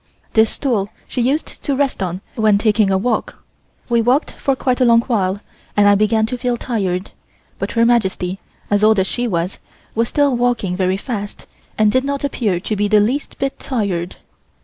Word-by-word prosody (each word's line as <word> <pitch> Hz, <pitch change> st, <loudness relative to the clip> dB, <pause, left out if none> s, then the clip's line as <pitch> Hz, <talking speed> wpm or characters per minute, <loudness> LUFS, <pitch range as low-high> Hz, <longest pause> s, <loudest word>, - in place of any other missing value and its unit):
This 220 Hz, 0 st, +4 dB
stool 220 Hz, -8 st, -1 dB, 0.2 s
she 250 Hz, -, -2 dB
used 275 Hz, +6 st, -1 dB
to 280 Hz, -, -1 dB
rest 275 Hz, -5 st, 0 dB
on 180 Hz, 0 st, -3 dB
when 215 Hz, -3 st, +3 dB
taking 210 Hz, -1 st, +2 dB
a 190 Hz, -, +3 dB
walk. 240 Hz, +6 st, -2 dB, 0.4 s
We 235 Hz, -1 st, +2 dB
walked 250 Hz, +6 st, +2 dB
for 275 Hz, -, -1 dB
quite 255 Hz, 0 st, 0 dB
a -, -, +5 dB
long 230 Hz, -1 st, +5 dB
while 200 Hz, -5 st, -1 dB, 0.4 s
and 205 Hz, 0 st, +5 dB
I 205 Hz, -, +7 dB
began 215 Hz, +2 st, +2 dB
to 250 Hz, +2 st, -4 dB
feel 245 Hz, 0 st, 0 dB
tired, 195 Hz, -6 st, -2 dB, 0.5 s
but -, -, -3 dB
Her 230 Hz, 0 st, +3 dB
Majesty, 195 Hz, -5 st, +1 dB, 0.3 s
as 205 Hz, 0 st, +2 dB
old 215 Hz, 0 st, +5 dB
as 190 Hz, -, +3 dB
she 240 Hz, +5 st, -2 dB
was, 175 Hz, -2 st, -2 dB, 0.3 s
was 230 Hz, +1 st, +1 dB
still 285 Hz, -1 st, +2 dB
walking 240 Hz, -7 st, 0 dB
very 185 Hz, 0 st, +1 dB
fast 205 Hz, -2 st, -6 dB, 0.3 s
and 215 Hz, -1 st, +4 dB
did 260 Hz, +2 st, +2 dB
not 280 Hz, 0 st, -2 dB
appear 220 Hz, -10 st, 0 dB
to 215 Hz, +4 st, -3 dB
be 205 Hz, 0 st, +1 dB
the 210 Hz, +1 st, +4 dB
least 250 Hz, +8 st, -1 dB
bit 275 Hz, 0 st, -3 dB
tired. 195 Hz, -9 st, -2 dB
220 Hz, 195 wpm, -18 LUFS, 200-245 Hz, 0.5 s, I